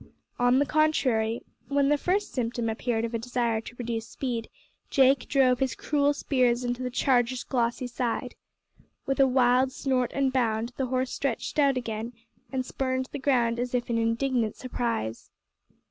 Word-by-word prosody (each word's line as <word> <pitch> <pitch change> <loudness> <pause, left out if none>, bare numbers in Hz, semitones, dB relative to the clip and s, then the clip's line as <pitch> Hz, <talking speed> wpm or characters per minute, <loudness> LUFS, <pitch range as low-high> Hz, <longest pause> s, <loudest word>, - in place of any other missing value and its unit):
On 245 +1 +4
the 285 - +3
contrary, 260 -8 +1 0.2
when 280 0 +2
the 295 - +4
first 375 +7 -1
symptom 235 -2 -1
appeared 225 0 -1
of 230 - -5
a 230 - 0
desire 235 -1 -1
to 240 - -11
reduce 230 -2 -3
speed 240 -4 -4 0.4
Jake 270 -1 +4
drove 255 -3 +3
his 265 -1 0
cruel 290 -1 +1
spurs 250 -4 +1
into 245 +1 -2
the 250 - -2
charger's 250 -1 +1
glossy 240 -1 -1
side. 240 -1 -2 0.7
With 270 0 -1
a 270 - +6
wild 255 0 +3
snort 255 -3 0
and 270 -1 +1
bound 230 -2 0
the 265 - -1
horse 255 +1 -1
stretched 275 +2 -2
out 275 -2 +4
again 230 -1 -4 0.4
and 260 -1 -2
spurned 260 0 -2
the - - -5
ground 240 -4 +2
as 250 +1 -2
if 245 -1 -1
in 230 - +1
indignant 230 0 0
surprise. 230 - -3
250 Hz, 165 wpm, -27 LUFS, 235-265 Hz, 0.7 s, a